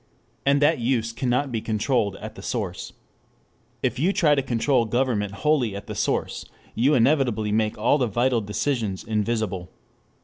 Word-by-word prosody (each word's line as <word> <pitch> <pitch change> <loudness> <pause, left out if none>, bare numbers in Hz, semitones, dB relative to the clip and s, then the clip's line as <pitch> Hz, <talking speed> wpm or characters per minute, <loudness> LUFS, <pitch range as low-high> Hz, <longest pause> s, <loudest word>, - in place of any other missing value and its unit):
And 140 +1 +4
that 150 -1 +3
use 115 -1 0
cannot 125 +3 0
be 115 -2 -2
controlled 110 -2 0
at - - -8
the - - -11
source. - - -4 0.9
If - - 0
you 175 +7 +3
try 155 -6 +3
to 140 - +2
control 125 0 +1
government 115 -3 0
wholly 130 -9 +2
at 100 - -7
the - - -6
source, - - -1 0.3
you 135 +6 +3
inevitably 120 -5 +2
make 110 0 0
all 120 +7 +2
the 125 - +2
vital 120 +2 +1
decisions 105 -1 -2
invisible. 105 -4 -2
120 Hz, 160 wpm, -24 LUFS, 105-135 Hz, 0.9 s, And